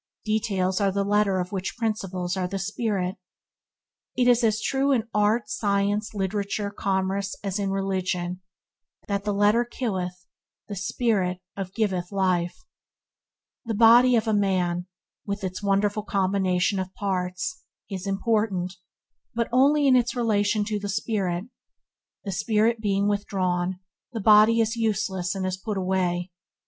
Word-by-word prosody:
Details 205 -3 0
are 200 -1 +3
the 200 +1 0
letter 205 -1 +2
of 180 0 -3
which 190 +1 -4
principles 195 -6 -2
are 185 -1 -1
the 195 +2 -4
spirit. 195 -2 -2 1.0
It 250 -1 +3
is 245 0 +4
as 215 -1 +2
true 270 +5 +1
in 235 -4 +1
art, 210 +2 +2
science, 205 0 0
literature, 200 +1 -2
commerce, 195 0 -1
as 200 0 -2
in 200 -1 -1
religion, 185 -2 -2 0.7
that 200 -1 -2
"the 210 - +1
letter 205 +4 +3
killeth, 185 -7 -4 0.4
the 205 - -5
spirit 190 -2 0 0.2
of 195 -1 -6
giveth 190 -5 -1
life." 185 - 0 1.0
The 225 -1 -2
body 240 +3 +7
of 225 -1 +1
a 220 - +2
man, 180 -3 +1 0.4
with 200 0 -3
its 185 0 -4
wonderful 205 +1 +1
combination 190 -1 +1
of 185 0 -4
parts, 185 - -2 0.3
is 190 -1 -5
important, 195 -2 0 0.6
but 235 0 0
only 285 +4 +4
in 265 -2 +6
its 245 0 +2
relation 210 -3 +1
to 210 0 -2
the 205 0 -5
spirit. 195 -3 -1 0.8
The 200 - -4
spirit 220 +4 +1
being 200 -1 +1
withdrawn, 185 -3 -1 0.3
the 225 - -3
body 215 +2 +6
is 225 +1 0
useless 200 -5 -1
and 190 -1 -2
is 185 0 -2
put 205 +1 -4
away. 185 -1 -1
200 Hz, 145 wpm, -25 LUFS, 185-215 Hz, 1.0 s, body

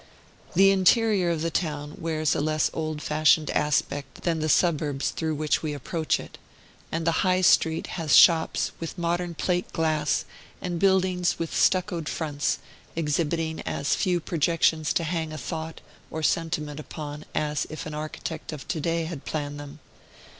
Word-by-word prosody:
The 195 +2 +7
interior 195 0 +3
of 165 -2 -1
the 165 - -1
town 150 -3 -2
wears 155 -2 0
a - - 0
less 155 0 +1
old 155 -1 -3
fashioned 155 0 +3
aspect 145 -1 -1
than 165 -2 0
the 155 0 -1
suburbs 150 -4 +2
through 160 -1 -2
which 150 0 0
we 155 -2 -2
approach 155 +3 -1
it; - - -11 0.5
and 165 0 -2
the 165 -1 +2
High 185 -1 +2
Street 160 -2 +4 0.2
has 155 -3 +3
shops 165 -2 +5
with 165 +2 -6
modern 175 0 -1
plate 180 +2 -1
glass, 155 -2 0 0.3
and 175 -2 -3
buildings 185 -2 +2
with 165 -1 -4
stuccoed 175 -4 +2
fronts, 150 -2 -1 0.4
exhibiting 160 +1 -1
as 140 - -1
few 180 -3 +1
projections 160 -1 +1
to 170 - +1
hang 160 -1 -2
a 155 - -6
thought 160 0 -5 0.3
or 160 - -5
sentiment 155 -2 -1
upon 150 -1 -7
as 150 -1 -1
if 155 - -6
an 155 - -6
architect 155 +2 -5
of 150 -3 -8
to 160 - -1
day 165 +2 0
had 160 -4 -6
planned 145 -1 -4
them. 145 0 -9
160 Hz, 160 wpm, -26 LUFS, 150-170 Hz, 0.5 s, The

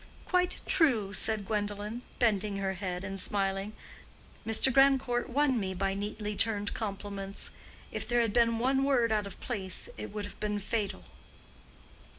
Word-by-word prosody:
"Quite 360 0 +1
true," 230 - +3
said 210 +1 +1
Gwendolen, 210 +2 -2 0.2
bending 210 -3 +1
her 195 -1 -1
head 180 -1 -4
and 195 0 -4
smiling. 195 +1 -1 0.7
"Mr. 225 +4 +4
Grandcourt 270 -2 +4
won 265 -1 +2
me 190 -2 -2
by 195 +1 0
neatly 210 +1 -3
turned 205 -2 +1
compliments. 200 -2 -5 0.4
If - - -4
there 240 0 +3
had 225 -3 0
been 230 -1 +4
one 265 +3 +2
word 250 -5 +3
out 210 -2 +1
of 200 - -10
place 195 -7 -3
it 105 - -5
would 210 -1 -4
have 205 - -10
been 210 -1 -1
fatal." 205 0 -2
210 Hz, 155 wpm, -31 LUFS, 195-240 Hz, 0.7 s, Mr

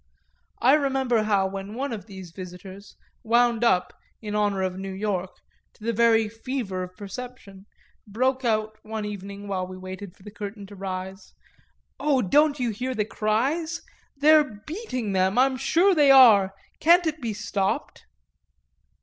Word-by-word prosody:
I 260 +3 +6
remember 265 -5 +2
how 200 -2 +2
when 195 +2 -6
one 270 0 -3
of 210 -1 -7
these 190 -4 -10
visitors, 185 +2 -10 0.3
wound 235 0 +2
up, 180 -6 +2 0.3
in 210 -2 -5
honour 205 -2 +1
of 185 -1 -2
New 195 0 -5
York, 190 -2 -3 0.4
to - - -19
the 230 +1 -1
very 225 0 +4
fever 225 -3 -4
of 180 0 -8
perception, 205 -2 -9 0.4
broke 260 +5 0
out 215 -2 -1
one 215 -1 -5
evening 200 0 -7
while 185 -2 -2
we 185 0 -9
waited 185 0 -8
for 190 - -21
the 210 - -10
curtain 205 0 -7
to 200 +1 -12
rise, 190 0 -7 0.6
"Oh 275 -3 +2
don't 295 +8 +3
you 245 -2 0
hear 250 +5 -4
the 210 -2 0
cries? 270 +12 -1 0.3
They're 295 -7 +4
beating 305 - -4
them, 190 +2 +1
I'm 265 +1 +4
sure 335 +9 +3
they 295 -4 +4
are; 215 -8 +7 0.2
can't 345 +2 +5
it 315 -1 -2
be 230 -3 -2
stopped?" 215 +4 -3
215 Hz, 160 wpm, -25 LUFS, 195-255 Hz, 0.6 s, are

